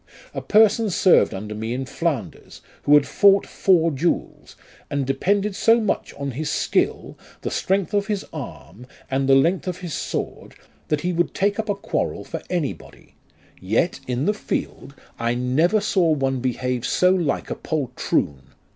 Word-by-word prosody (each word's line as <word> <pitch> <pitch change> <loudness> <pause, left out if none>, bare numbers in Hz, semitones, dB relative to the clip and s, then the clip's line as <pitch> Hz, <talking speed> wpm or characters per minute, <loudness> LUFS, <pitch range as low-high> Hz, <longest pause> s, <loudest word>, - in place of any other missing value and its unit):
A - - -4
person 215 +1 +4
served 185 0 +4
under 105 +2 -6
me 110 +3 -3
in 130 +1 -3
Flanders, 150 -1 -4 0.2
who 145 - +6
had 145 -1 +4
fought 200 -1 +4
four 170 -4 +2
duels, 155 +5 -2 0.3
and 140 -1 -1
depended 195 +9 0
so 230 +3 +4
much 215 -3 -1
on 140 -1 -4
his 150 +5 -4
skill, - - -1 0.2
the - - -3
strength 195 -1 0
of 205 0 +1
his 205 -3 -2
arm, 125 +4 -9 0.2
and 135 0 0
the 135 - +7
length 170 +8 +2
of 180 0 -4
his 175 -4 -5
sword, - - -4 0.3
that 150 -1 0
he 180 +2 -1
would 175 +1 0
take 200 +2 +1
up 220 0 -3
a 205 - +1
quarrel 200 - -3
for - - -6
anybody; 170 -7 -5 0.5
yet, 110 - 0
in 125 +3 -1
the 210 - +2
field, 145 -8 -5 0.2
I 115 +1 0
never 140 - +2
saw 190 -4 +2
one 135 -4 +1
behave 125 -1 -2
so 180 +7 +3
like 175 -5 -1
a - - -1
poltroon. 75 - -2
160 Hz, 165 wpm, -22 LUFS, 130-195 Hz, 0.5 s, the